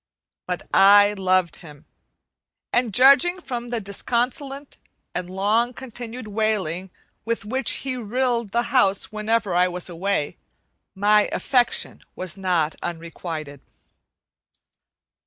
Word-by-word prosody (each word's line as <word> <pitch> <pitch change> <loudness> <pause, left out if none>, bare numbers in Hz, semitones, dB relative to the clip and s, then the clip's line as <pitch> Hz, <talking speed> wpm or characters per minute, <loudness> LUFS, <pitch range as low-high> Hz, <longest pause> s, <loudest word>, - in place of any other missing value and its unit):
But - - -4
I 205 +1 +7
loved 185 -2 +1
him, 150 -3 -14 0.9
and 245 -2 +2
judging 275 - +5
from 240 -7 -5
the 240 -1 -2
disconsolate 250 +7 -3 0.4
and 180 0 -4
long 215 +6 +1
continued 240 -2 -7
wailing 200 -4 -1 0.3
with 230 -2 -3
which 255 +2 -1 0.2
he 260 -1 -2
rilled 240 0 -1
the 235 +2 +1
house 200 -7 +2
whenever 215 -2 0
I 180 +1 +4
was 180 0 -4
away, 175 -3 -2 0.6
my 210 +2 +3
affection 245 -3 +1
was 185 -1 -3
not 180 -5 0
unrequited. 165 -4 -6
210 Hz, 110 wpm, -23 LUFS, 185-240 Hz, 0.9 s, I